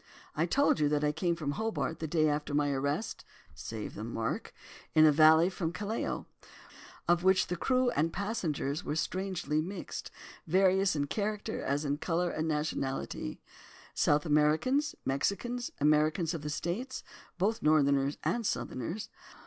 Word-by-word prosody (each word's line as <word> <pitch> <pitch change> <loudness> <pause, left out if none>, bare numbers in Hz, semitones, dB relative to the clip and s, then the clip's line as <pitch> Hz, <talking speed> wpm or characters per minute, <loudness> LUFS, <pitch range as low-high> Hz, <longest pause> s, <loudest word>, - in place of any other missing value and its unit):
I 160 +3 +1
told 280 - +3
you 150 -1 +3
that 150 0 +1
I 150 - +3
came 170 +2 0
from 150 -4 -3
Hobart, 220 -3 -2
the 160 - -3
day 155 0 +2
after 150 -1 -1
my 145 -1 +2
arrest 140 +8 -2 0.3
(save 105 +7 -6
the 105 - -6
mark!), 115 0 -3 0.4
in 155 0 +8
a 155 - +7
vessel 160 +4 +6
from 165 -3 -2
Callao, 210 +5 -3 0.8
of 175 0 +3
which 190 0 +4
the 180 - -3
crew 255 +6 +2
and 165 -3 +1
passengers 170 -7 -2
were 150 - -2
strangely 185 -3 -1
mixed, 185 +3 -6 0.4
various 190 +1 +3
in 145 -1 0
character 210 +5 -3
as 145 +2 -1
in 145 +1 -1
colour 175 +1 0
and 155 +1 -2
nationality; 145 - -3 0.5
South 145 +1 +2
Americans, 160 - +2
Mexicans, 235 - -1
Americans 155 +3 +2
of 165 - -4
the 150 - -4
States, 190 - -3 0.3
both 210 +5 0
Northerners 140 -2 +3
and 240 - 0
Southerners. 170 - -3
160 Hz, 150 wpm, -31 LUFS, 150-190 Hz, 0.8 s, in